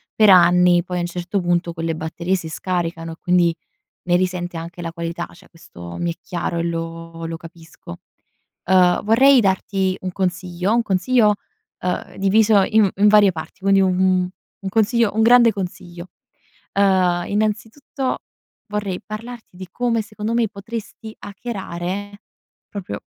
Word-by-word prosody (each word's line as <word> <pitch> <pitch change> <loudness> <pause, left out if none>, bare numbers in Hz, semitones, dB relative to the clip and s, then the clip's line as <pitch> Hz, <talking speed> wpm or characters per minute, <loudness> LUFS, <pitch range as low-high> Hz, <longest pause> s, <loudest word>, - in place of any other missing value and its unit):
per 215 -1 +5
anni, 175 -1 +5
poi 180 0 -4
a - - -1
un - - -1
certo 175 +3 -3
punto 175 -1 0
quelle 165 0 -3
batterie 170 +3 -2
si 170 -3 -5
scaricano, 165 -1 -3
quindi 175 -2 +2 0.5
ne 175 -1 +2
risente 180 -1 -2
anche 170 +2 -8
la 165 -1 -5
qualità. 170 0 -4
Cioè, 185 +2 -18
questo 85 - -11
mi 175 0 -1
è - - -16
chiaro 175 -1 -3
e 170 - -1
lo 165 0 -5
lo 165 0 -4
capisco. 165 - -12 0.7
Ehm, 180 -1 +4
vorrei 260 +5 +6
darti 190 -2 0
un 185 - -4
consiglio, 180 +1 -2
un 240 - +3
consiglio, 210 +2 +2 0.4
ehm, 180 0 -3
diviso 205 +1 +4
in 215 0 +3
in 205 +2 +4
varie 205 -2 +6
parti; 160 +2 -9
quindi 195 0 +4
un 190 - +3
un 185 -1 +2 0.3
un 195 - -2
consiglio 225 +2 +2
un 220 - +2
grande 235 0 +6
consiglio. 175 -2 -7 0.7
Ehm, 185 -3 +2
innanzitutto 225 +6 -2 0.5
vorrei 205 -3 -3
parlarti 225 -1 -9
di 185 +1 -8
come, 235 -2 0
secondo 215 +1 -5
me, 235 -1 +2
potresti 220 +2 -8
hackerare, 200 -2 -6 0.5
proprio 180 - -6
185 Hz, 150 wpm, -20 LUFS, 175-210 Hz, 0.7 s, vorrei